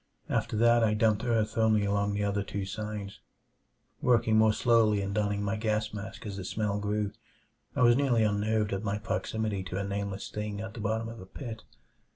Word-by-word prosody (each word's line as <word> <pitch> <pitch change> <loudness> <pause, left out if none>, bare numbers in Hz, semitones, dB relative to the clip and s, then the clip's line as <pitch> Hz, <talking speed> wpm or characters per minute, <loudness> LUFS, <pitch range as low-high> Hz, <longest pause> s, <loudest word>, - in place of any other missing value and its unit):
After 110 - 0
that 120 +1 +5
I 105 -1 +3
dumped 110 0 +2
earth 115 -2 0
only 110 -2 +3
along 100 0 0
the 105 - 0
other 100 0 0
two 100 0 -4
sides; 105 0 -5 0.8
working 115 -3 +3
more 110 0 +6
slowly 110 -2 +3
and 100 0 -2
donning 105 -1 0
my 100 +1 0
gas 110 0 -1
mask 100 0 -7
as 100 -2 -5
the 95 - -5
smell 105 +1 -1
grew. 105 0 -1 0.6
I 135 - +3
was 120 -1 +6
nearly 125 -4 +3
unnerved 105 0 +1
at 95 - -2
my 105 -1 -1
proximity 105 -1 -2
to 95 0 -4
a 100 - -1
nameless 100 0 -4
thing 105 -1 -4
at 110 0 -6
the 115 - -8
bottom 110 +2 -1
of 115 0 -8
a 95 - -11
pit. 110 +2 -8
105 Hz, 195 wpm, -29 LUFS, 100-110 Hz, 0.8 s, more